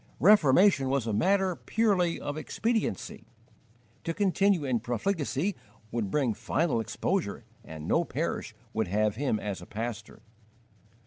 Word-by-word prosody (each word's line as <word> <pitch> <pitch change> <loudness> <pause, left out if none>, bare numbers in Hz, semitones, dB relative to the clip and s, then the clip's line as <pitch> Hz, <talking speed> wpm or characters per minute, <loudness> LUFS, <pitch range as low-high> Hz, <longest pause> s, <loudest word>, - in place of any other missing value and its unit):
Reformation 175 -5 +5
was 135 -3 0
a 110 - -1
matter 190 - +2
purely 190 -4 +1
of 145 - -4
expediency: 220 - -2 0.8
to 165 - -3
continue 195 -3 +2
in 125 -3 +1
profligacy 150 - -1 0.4
would 115 -4 -2
bring 130 -1 +1
final 120 +5 0
exposure, 115 - -2 0.2
and 80 0 -8
no 170 - +3
parish 150 -8 -3 0.2
would 110 -2 0
have 105 +3 +1
him 125 -4 0
as 100 -4 -4
a 90 - -11
pastor. 110 +1 -6
140 Hz, 130 wpm, -29 LUFS, 110-185 Hz, 0.8 s, Reformation